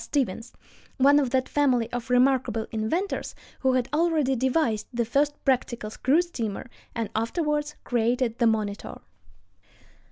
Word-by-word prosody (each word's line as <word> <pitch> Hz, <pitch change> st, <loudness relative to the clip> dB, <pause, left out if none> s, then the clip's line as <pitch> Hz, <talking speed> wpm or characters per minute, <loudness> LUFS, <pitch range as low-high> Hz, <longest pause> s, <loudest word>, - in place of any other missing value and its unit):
Stevens, 245 Hz, -5 st, -2 dB, 0.5 s
one 285 Hz, +2 st, +6 dB
of 270 Hz, -4 st, 0 dB
that 260 Hz, +1 st, +1 dB
family 255 Hz, -6 st, +2 dB
of 245 Hz, +1 st, -5 dB
remarkable 250 Hz, -3 st, +2 dB
inventors, 230 Hz, -, -2 dB, 0.2 s
who 265 Hz, -1 st, +2 dB
had 255 Hz, -2 st, +1 dB
already 310 Hz, -4 st, +2 dB
devised 255 Hz, -3 st, 0 dB
the 240 Hz, -1 st, -1 dB
first 285 Hz, +5 st, +1 dB
practical 240 Hz, -5 st, 0 dB
screw 290 Hz, +9 st, +2 dB
steamer, 230 Hz, -, -4 dB, 0.3 s
and 230 Hz, -3 st, -3 dB
afterward 295 Hz, +6 st, -1 dB
created 240 Hz, 0 st, 0 dB
the 235 Hz, -, +4 dB
Monitor. 210 Hz, -2 st, -2 dB
255 Hz, 130 wpm, -26 LUFS, 230-285 Hz, 0.5 s, one